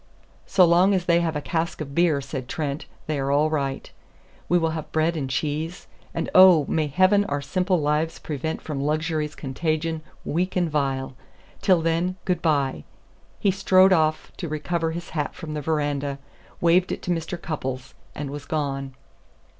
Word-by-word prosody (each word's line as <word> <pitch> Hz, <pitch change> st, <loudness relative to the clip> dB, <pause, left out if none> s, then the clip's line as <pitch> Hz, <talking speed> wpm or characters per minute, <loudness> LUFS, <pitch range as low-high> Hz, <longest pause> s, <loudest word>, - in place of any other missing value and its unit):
"So 185 Hz, -, +5 dB
long 180 Hz, +4 st, +4 dB
as 180 Hz, -2 st, -1 dB
they 170 Hz, -1 st, +4 dB
have 165 Hz, -2 st, -1 dB
a 150 Hz, -, -1 dB
cask 165 Hz, +3 st, -2 dB
of 140 Hz, -3 st, -6 dB
beer," 165 Hz, -3 st, +3 dB
said 135 Hz, -2 st, -6 dB
Trent, 145 Hz, -2 st, -3 dB, 0.2 s
"they 155 Hz, -2 st, -2 dB
are 135 Hz, 0 st, -1 dB
all 150 Hz, +2 st, +3 dB
right. 140 Hz, -3 st, -2 dB, 0.6 s
We 175 Hz, -, +4 dB
will 165 Hz, -2 st, +1 dB
have 155 Hz, -1 st, -6 dB
bread 160 Hz, +2 st, +1 dB
and 140 Hz, -4 st, -3 dB
cheese, 155 Hz, +5 st, -2 dB, 0.3 s
and 165 Hz, -, -3 dB
oh, 185 Hz, -5 st, +8 dB
may 155 Hz, -2 st, 0 dB
Heaven 185 Hz, +7 st, +4 dB
our 145 Hz, -4 st, -1 dB
simple 180 Hz, +6 st, 0 dB
lives 150 Hz, +2 st, 0 dB
prevent 155 Hz, +1 st, -4 dB
from 145 Hz, -3 st, -4 dB
luxury's 155 Hz, +1 st, -1 dB
contagion, 155 Hz, +3 st, -2 dB, 0.2 s
weak 180 Hz, +4 st, -1 dB
and 175 Hz, -3 st, +1 dB
vile! 135 Hz, -3 st, -1 dB, 0.5 s
Till 180 Hz, -4 st, +3 dB
then, 165 Hz, +3 st, 0 dB
good 180 Hz, -2 st, 0 dB
by." 140 Hz, -, +1 dB, 0.6 s
He 200 Hz, -, +3 dB
strode 190 Hz, 0 st, +5 dB
off 155 Hz, -2 st, +1 dB
to 170 Hz, -, -4 dB
recover 165 Hz, +2 st, -1 dB
his 170 Hz, +2 st, -6 dB
hat 150 Hz, -3 st, -2 dB
from 155 Hz, -2 st, -7 dB
the 150 Hz, -, -3 dB
veranda, 145 Hz, -2 st, -1 dB, 0.4 s
waved 175 Hz, +2 st, +3 dB
it -, -, -4 dB
to 180 Hz, -, -1 dB
Mr. 170 Hz, +1 st, -3 dB
Cupples, 130 Hz, -6 st, -5 dB, 0.2 s
and 140 Hz, -2 st, -5 dB
was 145 Hz, -1 st, -7 dB
gone. 135 Hz, -4 st, -3 dB
155 Hz, 175 wpm, -24 LUFS, 145-170 Hz, 0.6 s, oh